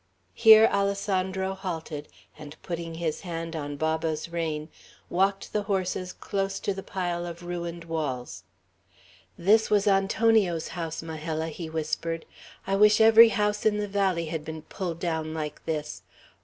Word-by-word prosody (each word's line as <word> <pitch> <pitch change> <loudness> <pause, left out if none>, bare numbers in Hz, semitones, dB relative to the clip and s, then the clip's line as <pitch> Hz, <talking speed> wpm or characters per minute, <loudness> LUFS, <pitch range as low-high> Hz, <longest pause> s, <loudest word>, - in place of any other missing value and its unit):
Here 220 - +8
Alessandro 190 -1 0
halted, 165 -6 -5 0.3
and 150 0 -11
putting 170 -1 -5
his 160 -2 -2
hand 165 -2 -5
on 145 -2 -4
Baba's 160 +1 -1
rein, 160 -2 -3 0.4
walked 195 +2 0
the 210 - +1
horses 185 -2 -2
close 195 -1 -3
to 200 - -1
the 195 - -6
pile 175 -3 -3
of 170 0 -7
ruined 170 -1 -5
walls. 150 -7 -4 0.9
"This 215 +5 +4
was 205 -1 +3
Antonio's 195 -3 +2
house, 165 -2 -5
Majella," 160 0 -4
he 160 +1 -7
whispered. 160 +1 -3 0.4
"I 195 - 0
wish 210 +1 +6
every 225 +1 +8
house 210 -1 0
in 210 -1 +3
the 210 0 -2
valley 195 -4 0
had 160 -1 -4
been 160 0 -7
pulled 170 -2 -5
down 160 -2 -2
like 150 -2 -5
this. 155 -2 -3
170 Hz, 145 wpm, -27 LUFS, 160-195 Hz, 0.9 s, Here